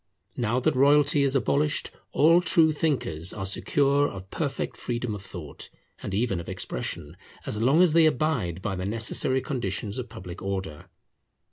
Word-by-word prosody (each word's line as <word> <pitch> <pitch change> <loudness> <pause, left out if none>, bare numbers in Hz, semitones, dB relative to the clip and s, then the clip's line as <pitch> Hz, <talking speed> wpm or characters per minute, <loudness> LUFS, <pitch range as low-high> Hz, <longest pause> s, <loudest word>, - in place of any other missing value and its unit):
Now 120 +1 0
that - - +1
royalty 145 +2 +4
is 140 0 +2
abolished, 145 +2 0 0.2
all 165 +4 +5
true 165 -3 +4
thinkers 130 - -1
are 95 -2 -5
secure 140 +8 +2
of 95 -1 -10
perfect 135 -4 -3
freedom 120 -2 -3
of 105 - -6
thought, 85 -7 -9 0.3
and - - -5
even 100 -2 0
of 85 - -8
expression, 75 +3 -5 0.3
as 105 - -3
long 140 +9 +5
as 170 -4 +3
they 165 -1 +6
abide 120 - -1
by 95 - -2
the 90 +1 -4
necessary 115 +4 +1
conditions 110 -4 -3
of 125 -2 -6
public 90 -4 -9
order. 95 -6 -5
125 Hz, 160 wpm, -26 LUFS, 95-145 Hz, 0.3 s, they